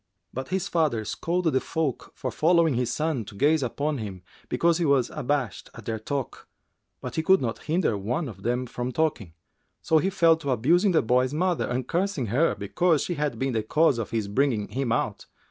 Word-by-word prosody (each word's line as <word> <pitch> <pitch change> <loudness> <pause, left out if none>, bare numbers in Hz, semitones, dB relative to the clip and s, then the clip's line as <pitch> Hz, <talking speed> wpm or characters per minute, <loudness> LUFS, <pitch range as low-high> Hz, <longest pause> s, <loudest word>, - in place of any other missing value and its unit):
But 130 +1 -4
his 190 +1 -1
father 150 - 0
scolded 170 - -1
the 130 - +3
folk 160 -4 -3
for 130 - -4
following 165 +3 +3
his 125 -1 0
son 155 -6 -1
to 100 - -11
gaze 150 +7 +3
upon 140 +3 -2
him, 95 -4 -7 0.3
because 170 0 +2
he 170 - +1
was 140 -4 +2
abashed 135 -5 -2
at - - -11
their 110 -1 -3
talk, 135 +4 -4 0.5
but - - -6
he - - +3
could 190 +4 +5
not 115 -3 -4
hinder 160 - +1
one 120 - -2
of 100 -5 -9
them 125 +4 -1
from 125 +1 -4
talking; 145 - -1 0.5
so 160 - +4
he 190 - +1
fell 165 -4 +4
to 160 -3 -5
abusing 170 - +3
the 160 - +3
boy's 125 +4 +2
mother 180 +1 0
and 125 0 -2
cursing 180 -6 -1
her 160 +6 +3
because 170 -5 +1
she 175 - -2
had 145 -6 -2
been 135 +1 -1
the 110 - +1
cause 140 +3 +2
of 115 - -3
his 110 -3 -2
bringing 110 -1 0
him 130 -2 -2
out. - - -1
140 Hz, 205 wpm, -26 LUFS, 120-165 Hz, 0.5 s, could